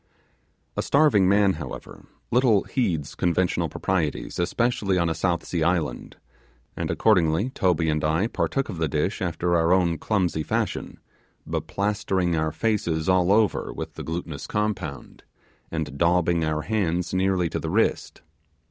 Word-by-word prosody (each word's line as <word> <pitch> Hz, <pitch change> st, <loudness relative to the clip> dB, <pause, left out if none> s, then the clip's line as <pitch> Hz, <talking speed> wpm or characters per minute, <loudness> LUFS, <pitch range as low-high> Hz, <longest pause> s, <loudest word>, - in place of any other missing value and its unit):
A -, -, 0 dB
starving 140 Hz, -11 st, +4 dB
man, 100 Hz, -1 st, +4 dB
however, -, -, -9 dB, 0.2 s
little 120 Hz, -5 st, +4 dB
heeds 80 Hz, -, -1 dB
conventional 90 Hz, 0 st, 0 dB
proprieties, 85 Hz, -6 st, -2 dB
especially 100 Hz, +1 st, 0 dB
on 85 Hz, -1 st, +1 dB
a -, -, 0 dB
South 85 Hz, -1 st, -1 dB
Sea 85 Hz, -, -2 dB
Island, 80 Hz, -7 st, -1 dB, 0.6 s
and -, -, -3 dB
accordingly 90 Hz, +2 st, +2 dB
Toby 90 Hz, -, +1 dB
and 75 Hz, -1 st, 0 dB
I 80 Hz, +5 st, +2 dB
partook 135 Hz, +3 st, -1 dB
of 90 Hz, -6 st, -6 dB
the 80 Hz, -, +1 dB
dish 75 Hz, +8 st, -1 dB
after 85 Hz, -1 st, 0 dB
our 85 Hz, 0 st, +2 dB
own 85 Hz, -3 st, +2 dB
clumsy 95 Hz, -7 st, 0 dB
fashion, -, -, -3 dB, 0.5 s
beplastering 95 Hz, -3 st, -1 dB
our 80 Hz, 0 st, 0 dB
faces 80 Hz, -3 st, -1 dB
all 95 Hz, 0 st, +3 dB
over 105 Hz, 0 st, +2 dB
with -, -, -6 dB
the -, -, -8 dB
glutinous 80 Hz, -3 st, -5 dB
compound, 100 Hz, -9 st, -3 dB, 0.5 s
and 80 Hz, -4 st, -4 dB
daubing 85 Hz, -1 st, +2 dB
our 75 Hz, -1 st, -1 dB
hands 90 Hz, -5 st, -1 dB
nearly 95 Hz, -1 st, +1 dB
to -, -, -2 dB
the -, -, -4 dB
wrist. -, -, 0 dB
90 Hz, 145 wpm, -24 LUFS, 80-100 Hz, 0.6 s, starving